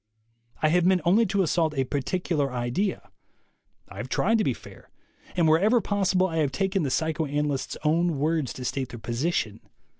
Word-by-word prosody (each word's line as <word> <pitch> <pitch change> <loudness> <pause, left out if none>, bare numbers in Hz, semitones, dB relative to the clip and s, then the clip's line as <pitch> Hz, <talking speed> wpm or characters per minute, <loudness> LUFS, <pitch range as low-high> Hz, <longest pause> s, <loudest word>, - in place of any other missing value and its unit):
I 155 - +5
have 175 +2 +3
meant 185 0 +3
only 210 +6 +4
to 195 +1 +1
assault 160 -2 +1
a 135 - +3
particular 145 +1 -1
idea. 125 +11 -2 0.8
I - - -12
have - - -5
tried 225 0 +2
to - - +2
be - - 0
fair; - - -15 0.5
and 170 -3 +3
wherever 200 +10 +4
possible 190 -3 +1
I 165 -3 -2
have 150 -4 +1
taken 195 +6 0
the 145 - -1
psychoanalysts' 150 -2 -1
own 165 +1 +2
words 155 -1 0
to 125 - -7
state 130 0 -2
their 120 - -8
position. 115 -1 -2
160 Hz, 175 wpm, -26 LUFS, 140-185 Hz, 0.8 s, I